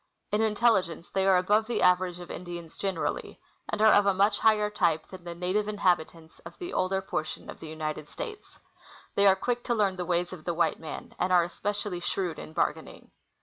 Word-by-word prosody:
In 210 - +2
intelligence 210 -6 +1
they 190 0 +1
are 190 -1 +6
above 210 +4 +2
the 240 - 0
average 180 -1 +3
of 175 - -9
Indians 175 -2 -7
generally, 195 -1 -3 0.3
and 215 - 0
are 220 - +7
of 205 0 +5
a 195 - +3
much 200 +3 +3
higher 210 -1 +3
type 170 -6 +1
than 185 -2 -11
the 170 0 -6
native 185 +4 0
inhabitants 175 -5 -1
of - - -12
the 355 0 -6
older 190 +1 0
portion 155 -5 -4
of - - -13
the 160 - -8
United 155 -1 -5
States. 425 -2 -8 0.6
They 200 0 +4
are 190 - +7
quick 240 +5 -2
to 240 - +1
learn 200 -4 +1
the 180 - -3
ways 175 +1 0
of 165 -4 -9
the 170 0 -2
white 170 - +1
man, 160 - -8
and 180 +1 +1
are 180 -1 +6
especially 200 +1 -3
shrewd 175 -2 -2
in - - -9
bargaining. - - -3
185 Hz, 205 wpm, -28 LUFS, 175-210 Hz, 0.6 s, are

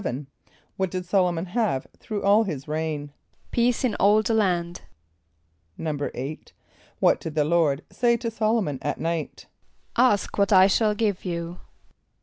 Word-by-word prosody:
= - - -35
What 190 -1 0
did 185 +1 -4
S[)o]l´o 180 -1 +2
mon 170 +1 -3
have 190 - -1
through 210 -2 -5
all 205 +2 +5
his 155 -9 -5
reign? 150 -2 -3 0.4
=Peace 240 +1 +1
in 245 -4 +1
all 210 +2 +4
the 225 - 0
land.= 175 -5 0 1.0
=8.= 145 -2 -4 0.6
What - - +4
did 160 -1 -7
the 150 -2 +2
Lord 155 -3 +2
say 235 -1 +2
to 230 0 -4
S[)o]l´o 225 0 +1
mon 145 -6 -4
at 145 -1 -3
night? 165 -1 -3 0.5
="Ask 235 -5 +2
what 200 +1 +3
I 190 -1 +8
shall 210 +2 +2
give 205 -3 -1
you." 170 -1 -4
185 Hz, 155 wpm, -25 LUFS, 160-215 Hz, 1.0 s, I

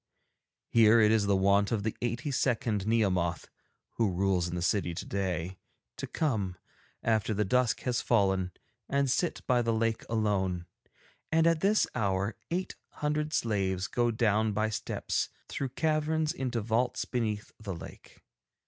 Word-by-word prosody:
Here 115 0 +6
it 105 -1 +5
is 110 -2 +3
the 100 - +3
wont 100 +1 +3
of 110 -3 0
the 110 - -2
eighty 120 +4 -2
second 115 -6 0
Nehemoth 95 -7 +1 0.5
(who 115 -3 +2
rules 90 -1 +1
in 85 - -4
the 85 - -2
city 85 -2 0
today) 95 -1 -3 0.4
to - - -4
come, 105 - -1 0.5
after 110 -1 +1
the 105 +1 +1
dusk 125 +3 +2
has 125 -1 0
fallen, 95 -5 +2 0.4
and 140 -2 +1
sit 175 +6 0
by 125 -2 +3
the 115 -1 0
lake 115 0 0
alone, 95 -6 0 0.7
and 160 0 +4
at 165 -1 +3
this 205 +5 +3
hour 100 -2 0
eight 185 +2 -2 0.2
hundred 150 +1 -1
slaves 95 -7 0
go 120 +4 +1
down 110 -2 +2
by 110 +1 0
steps - - -2 0.2
through 135 - -3
caverns 155 +2 0
into 125 -3 -2
vaults 115 +4 0
beneath 110 -4 -2
the 100 -4 -5
lake. 85 - -12
110 Hz, 150 wpm, -30 LUFS, 100-125 Hz, 0.7 s, Here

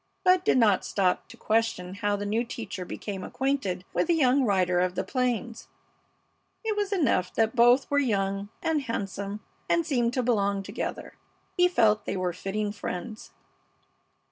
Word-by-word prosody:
Bud 365 -1 +4
did - - +3
not 210 -6 +4
stop 185 -3 0
to - - -14
question 215 -5 0
how 205 0 0
the 205 0 -4
new 220 +3 0
teacher 205 -6 -6
became 195 +1 -6
acquainted 245 -8 -2
with - - +1
the 340 - +3
young 270 -3 +3
rider 185 -5 +2
of 180 0 0
the - - -1
plains. 245 -2 -2 1.0
It 440 -1 -1
was 410 -1 -1
enough 270 - +1
that 225 +1 +1
both 245 +3 +5
were 285 - +4
young 200 -5 -1
and 320 -2 +1
handsome 200 -4 -4 0.3
and 335 -1 +2
seemed 245 -6 +1
to 255 - +1
belong 200 -4 +1
together. - - -5 0.4
He 360 -1 +5
felt 220 - +2
they - - -2
were 180 -1 -1
fitting 205 +3 -3
friends. 205 +2 -6
220 Hz, 165 wpm, -27 LUFS, 195-255 Hz, 1.0 s, both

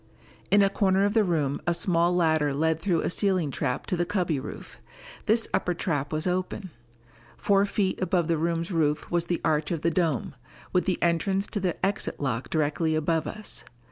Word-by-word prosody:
In 205 0 +5
a 195 - +4
corner 195 -1 +2
of 205 - 0
the 225 -1 +4
room 150 -7 0
a 175 - +2
small 170 0 +2
ladder 160 -4 +2
led 160 +2 +1
through 170 -2 +1
a - - -1
ceiling 185 -7 +1
trap 125 0 -2
to - - -1
the 175 - +1
cubby 175 -5 -1
roof. 130 - -9 0.5
This 225 +2 +4
upper 180 - 0
trap 150 -5 -2
was 155 +1 -1
open. 185 +1 -2 0.7
Four 200 0 +2
feet 195 -2 -1
above 180 -3 +1
the 165 -2 +1
room's 165 +2 -1
roof 155 -3 0
was 170 -1 +2
the 175 0 -1
arch 150 0 +1
of 170 -4 -2
the 170 - +1
dome, 160 -6 0 0.4
with 180 - +2
the 185 -3 +1
entrance 190 +4 +1
to 210 - -2
the 185 -3 -1
exit 195 +1 -2
lock 125 -3 -2
directly 155 +1 0
above 160 0 0
us. 215 +5 -4
170 Hz, 195 wpm, -26 LUFS, 155-190 Hz, 0.7 s, In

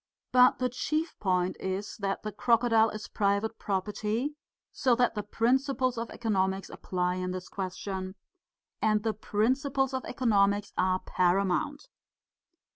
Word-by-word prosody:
But 250 0 +6
the 255 - +1
chief 310 +6 -2
point 185 -2 0
is 190 +2 -3
that 195 -2 -2
the 215 - -3
crocodile 230 0 +3
is 215 0 -7
private 205 +2 0
property, 210 +7 -2 0.4
so 255 -3 +2
that 245 0 +2
the 210 - -2
principles 255 +4 +1
of 230 0 -4
economics 195 -4 -1
apply 180 0 -2
in 185 0 -2
this 185 0 -5
question. 190 0 -5 0.7
And 215 -1 +2
the 220 - 0
principles 265 +6 0
of 260 - -2
economics 205 -4 +1
are 185 0 +1
paramount. 190 - 0
210 Hz, 130 wpm, -29 LUFS, 190-245 Hz, 0.7 s, But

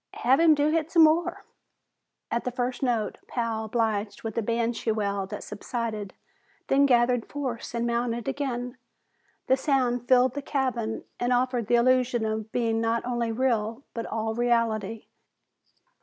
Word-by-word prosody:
"Have 260 +4 +3
him 325 -2 +6
do 290 +1 +2
hit 325 -1 0
some 335 -1 +6
more." 315 +2 +2 0.9
At 235 - 0
the - - -1
first 250 0 -3
note, 235 -5 -1
Pal 230 -2 -2
obliged 220 -2 -1
with 225 -2 -4
a 230 - +1
banshee 230 +1 -1
wail 200 -2 -1
that - - -6
subsided, 215 -1 -5 0.5
then 280 +1 +5
gathered 245 -2 +3
force 255 -5 -4
and 235 0 0
mounted 235 0 -1
again. 250 -3 -3 0.7
The 260 - +3
sound 250 -3 0
filled 255 -1 +5
the 285 - -4
cabin 255 -6 -2 0.2
and 245 +1 0
offered 245 -2 +1
the 240 - +3
illusion 250 -1 +3
of 220 0 -3
being 225 -2 0
not 230 +1 0
only 240 -2 -1
real, 230 0 0
but 230 - -4
all 220 0 -2
reality. 225 -2 0
240 Hz, 155 wpm, -26 LUFS, 225-255 Hz, 0.9 s, him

